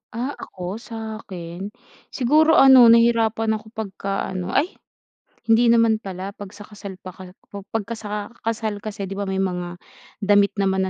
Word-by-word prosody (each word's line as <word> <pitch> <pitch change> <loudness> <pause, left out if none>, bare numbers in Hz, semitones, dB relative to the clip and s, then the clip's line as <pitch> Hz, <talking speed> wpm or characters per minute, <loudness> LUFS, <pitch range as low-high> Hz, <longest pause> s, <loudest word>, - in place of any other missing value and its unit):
Ah, 255 +4 -2
ako 185 +4 -6
sakin, 200 -6 -7 0.5
siguro 310 +5 +4
ano 265 -5 +8
nahirapan 225 -1 +3
ako 215 - -18
pagka 195 -2 -3
ano. 185 -1 -4
Ay, 335 +7 +2 0.8
hindi 230 +1 +4
naman 230 -1 +3
pala 190 +1 -6
pag 205 -2 -9
sa 205 0 -12
kasal 200 -3 -10
paka 185 0 -12 0.2
kub 200 - -6
pagka 225 +1 -3
sa 210 -1 -6
kasal 220 -2 -2
kasi 205 -2 -5
'di 190 - -7
ba 200 0 -4
may 190 - -2
mga 180 -2 -3 0.4
damit 205 -1 +3
naman 190 -1 +1
210 Hz, 155 wpm, -22 LUFS, 190-230 Hz, 0.8 s, ano